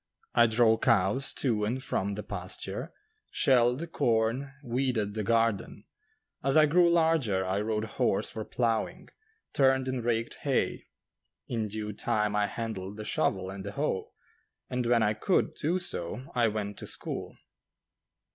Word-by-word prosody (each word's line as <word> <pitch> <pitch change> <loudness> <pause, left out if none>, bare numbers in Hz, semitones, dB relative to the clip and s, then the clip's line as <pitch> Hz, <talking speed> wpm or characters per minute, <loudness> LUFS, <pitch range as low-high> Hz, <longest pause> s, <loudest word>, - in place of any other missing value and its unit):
I 120 0 +6
drove 115 0 +3
cows 115 +3 +3
to 115 -6 0
and 125 +5 -1
from 100 -4 -1
the 105 - -5
pasture, 90 -3 -6 0.4
shelled 130 +5 +2
corn, 115 +3 +1
weeded 120 -4 -1
the 110 - -2
garden; 115 -2 0 0.6
as 135 +2 +3
I 155 - +8
grew 170 +3 +4
larger, 160 - +2
I 95 +2 0
rode 110 0 -1
horse 110 - 0
for 110 - -5
ploughing, 120 - -1 0.4
turned 130 -1 +3
and 130 -2 -2
raked 115 -1 -1
hay; - - 0 0.6
in 115 -3 -2
due 105 0 -5
time 105 +1 0
I 105 0 +2
handled 105 -4 -5
the 105 - -6
shovel 95 -2 0
and 95 0 -7
the 100 +1 -6
hoe, 140 -8 -2 0.6
and 125 -1 -1
when 120 -1 +4
I 105 0 +2
could 145 - +1
do 170 +4 0
so 125 - -4
I 120 -2 +3
went 105 -1 -3
to - - -7
school. - - -4
115 Hz, 150 wpm, -29 LUFS, 105-130 Hz, 0.6 s, I